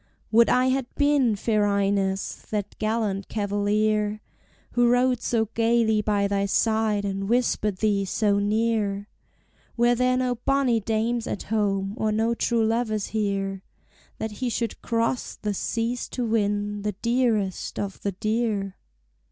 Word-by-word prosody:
Would 230 +1 +5
I 255 +1 +3
had 260 -1 0
been, 285 -6 +3
fair 210 0 +1
Ines, 195 -1 -1
that 205 -2 -3
gallant 215 -3 -1
cavalier 210 +1 0 0.5
Who 240 0 +3
rode 245 0 +2
so 230 -2 +1
gayly 225 -1 +2
by 205 -1 +1
thy 200 0 0
side 220 0 +1
and 195 0 -3
whispered 220 -4 +1
thee 205 -1 +1
so 200 +1 +1
near! 210 -1 0 0.7
Were 240 +1 +4
there 250 +1 +2
no 250 -1 0
bonny 275 -4 +2
dames 225 +2 -1
at - - -4
home, 195 -2 0
or 215 -1 +1
no 225 +2 +1
true 230 -1 +1
lovers 220 -2 -1
here, 195 -3 -2 0.6
That 220 - -4
he 245 +4 -3
should 230 0 -3
cross 230 +1 -1
the 210 -1 -3
seas 230 +4 -2
to 250 - -3
win 205 -2 0
the 210 0 -2
dearest 225 -3 0
of 195 -2 -4
the 200 - -2
dear? 215 -1 -1
215 Hz, 145 wpm, -25 LUFS, 205-235 Hz, 0.7 s, Would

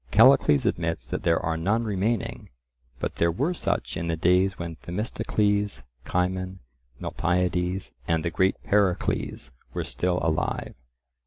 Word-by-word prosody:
Callicles 115 - +6
admits 85 -1 -1
that - - -4
there 85 -1 +3
are 80 0 -1
none 100 +8 +1
remaining, 110 +1 -1 0.5
but - - -3
there 85 - +3
were 140 - 0
such - - -2
in 85 +1 -3
the 85 - 0
days 90 +3 +3
when 85 -1 -5
Themistocles, 105 - -1 0.2
Cimon, 95 +1 -1 0.4
Miltiades, 90 +2 0 0.2
and 80 0 +1
the 85 - 0
great 95 +4 +2
Pericles 100 -3 0 0.2
were - - -1
still 90 0 -1
alive. 80 -2 -1
90 Hz, 135 wpm, -26 LUFS, 85-100 Hz, 0.5 s, Callicles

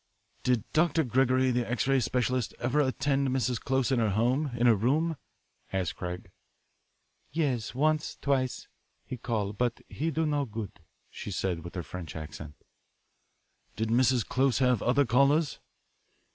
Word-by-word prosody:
"Did 125 -4 +1
Dr. 160 0 +3
Gregory, 130 0 +2
the 120 -2 -1
X 120 - 0
ray 135 -1 +4
specialist, 125 0 0
ever 125 +4 0
attend 135 0 +1
Mrs. 125 -2 0
Close 130 0 0
at 130 - +2
her 110 -2 +2
home, 125 +9 +1
in 120 - +2
her 120 - +7
room?" 145 +10 +1 0.6
asked 95 -3 -1
Craig. 90 0 -6 1.0
"Yes, 130 -9 -1
once, 155 +2 +1
twice, 130 -3 -1 0.4
he 130 - -5
call, 110 -4 -2
but 120 +3 -1
he 160 +3 -2
do 160 0 0
no 145 -2 0
good," 110 -6 -7 0.3
she - - -7
said 90 -3 -2
with 85 - -9
her 90 - -3
French 90 -2 -8
accent. 75 -1 -8 1.2
"Did 110 0 -2
Mrs. 125 0 +3
Close 130 -1 +2
have 125 -4 +2
other 135 +4 +3
callers?" 140 +5 +3
125 Hz, 150 wpm, -29 LUFS, 110-135 Hz, 1.2 s, her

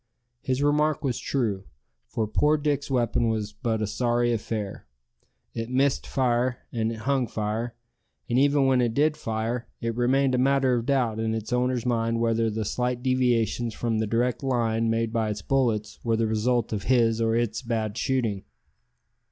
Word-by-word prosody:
His 130 +2 -1
remark 150 +1 +2
was 130 -4 -1
true, 105 -8 -1 0.4
for 110 - -1
poor 150 +8 +2
Dick's 145 -1 -1
weapon 120 -2 +1
was 110 -2 -2
but 110 +1 -2
a - - +1
sorry 120 +2 +1
affair. 105 - -4 0.7
It 115 0 -4
missed 135 +2 +1
fire, 125 -1 +1
and 115 -1 -1
it 115 - -5
hung 135 -3 +1
fire; 110 +3 -3 0.5
and 120 +1 +2
even 140 0 +4
when 130 -1 +3
it 115 -2 0
did 150 +1 +3
fire, 115 +1 -3
it 115 -1 -2
remained 130 +2 +2
a 125 - +2
matter 135 0 +3
of 120 0 -1
doubt 125 -6 +1
in 110 0 0
its 110 +2 -4
owner's 125 -1 0
mind 115 -1 0
whether 115 -1 +1
the 110 0 -3
slight 125 +3 -2
deviations 120 -3 +1
from 115 -2 -1
the 110 - 0
direct 120 +3 0
line 115 -4 0
made 115 0 0
by 110 -2 0
his 105 -1 -4
bullets 115 -6 0
were 115 -1 +1
the 115 - +1
result 110 +2 0
of 100 -2 -3
his 115 -2 +3
or 115 0 +2
its 115 -1 0
bad 110 -4 -2
shooting. 120 -6 -1
120 Hz, 175 wpm, -26 LUFS, 110-130 Hz, 0.7 s, even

